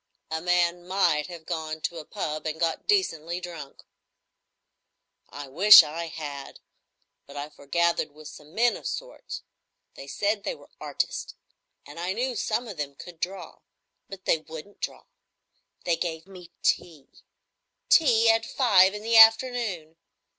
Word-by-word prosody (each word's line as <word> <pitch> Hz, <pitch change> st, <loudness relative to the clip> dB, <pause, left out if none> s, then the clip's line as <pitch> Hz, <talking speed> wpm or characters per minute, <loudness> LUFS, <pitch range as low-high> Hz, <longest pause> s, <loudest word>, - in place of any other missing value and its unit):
"A 160 Hz, 0 st, -2 dB
man 175 Hz, 0 st, +1 dB
might 175 Hz, -6 st, +1 dB
have 170 Hz, -3 st, -10 dB
gone 160 Hz, -2 st, -4 dB
to 165 Hz, +1 st, -3 dB
a 155 Hz, -, -10 dB
pub, 155 Hz, -6 st, -4 dB
and 155 Hz, 0 st, -4 dB
got 165 Hz, -2 st, -1 dB
decently 175 Hz, -, 0 dB
drunk." 165 Hz, -6 st, -10 dB, 1.5 s
"I 145 Hz, -1 st, -8 dB
wish 190 Hz, +10 st, +9 dB
I 165 Hz, +3 st, -5 dB
had; 145 Hz, -4 st, -8 dB, 0.7 s
but 140 Hz, +1 st, -11 dB
I 145 Hz, +1 st, -5 dB
forgathered 170 Hz, +3 st, -1 dB
with 150 Hz, +1 st, -13 dB
some 150 Hz, +2 st, -14 dB
men 240 Hz, +1 st, +3 dB
of -, -, -7 dB
sorts. -, -, -7 dB, 0.5 s
They 135 Hz, -, -11 dB
said 205 Hz, +7 st, -1 dB
they -, -, -4 dB
were -, -, -19 dB
artists, -, -, -4 dB, 0.5 s
and 145 Hz, +3 st, -11 dB
I 180 Hz, +2 st, -2 dB
knew 250 Hz, +3 st, -2 dB
some 230 Hz, +2 st, -2 dB
of 200 Hz, -6 st, -8 dB
them 140 Hz, -1 st, -5 dB
could 170 Hz, +3 st, -12 dB
draw,—but 190 Hz, +1 st, -9 dB
they 160 Hz, -, +2 dB
wouldn't 160 Hz, +5 st, -11 dB
draw. -, -, -5 dB, 0.8 s
They 170 Hz, -2 st, +1 dB
gave 160 Hz, -2 st, -4 dB
me 180 Hz, -3 st, -14 dB
tea,—tea 225 Hz, -, 0 dB
at 225 Hz, 0 st, +1 dB
five 205 Hz, -6 st, +4 dB
in 210 Hz, -, -7 dB
the 230 Hz, +1 st, +3 dB
afternoon! 225 Hz, -8 st, +4 dB
175 Hz, 145 wpm, -26 LUFS, 155-210 Hz, 1.5 s, wish